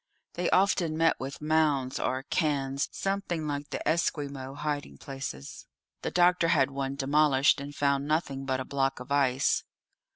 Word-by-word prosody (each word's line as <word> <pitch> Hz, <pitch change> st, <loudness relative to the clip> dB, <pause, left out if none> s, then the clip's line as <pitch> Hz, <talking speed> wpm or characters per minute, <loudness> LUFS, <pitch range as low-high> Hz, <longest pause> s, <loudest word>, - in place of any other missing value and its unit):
They 175 Hz, 0 st, -1 dB
often 180 Hz, -4 st, +2 dB
met 165 Hz, 0 st, +3 dB
with 135 Hz, +3 st, -6 dB
mounds 150 Hz, -4 st, +1 dB
or 130 Hz, +1 st, -1 dB
cairns 140 Hz, -3 st, -1 dB
something 195 Hz, -5 st, -2 dB
like 145 Hz, 0 st, -4 dB
the -, -, -4 dB
Esquimaux 140 Hz, -4 st, -1 dB
hiding 145 Hz, -, -4 dB
places. 135 Hz, -, -7 dB, 0.3 s
The -, -, -2 dB
doctor 180 Hz, -1 st, +3 dB
had 140 Hz, -5 st, +3 dB
one 135 Hz, 0 st, -3 dB
demolished, 140 Hz, 0 st, +3 dB
and 145 Hz, +1 st, -8 dB
found 140 Hz, 0 st, +1 dB
nothing 150 Hz, -3 st, -1 dB
but 130 Hz, -1 st, -1 dB
a 130 Hz, -, -4 dB
block 135 Hz, -1 st, -1 dB
of 125 Hz, +2 st, -10 dB
ice. 135 Hz, -2 st, +2 dB
140 Hz, 155 wpm, -28 LUFS, 135-155 Hz, 0.3 s, met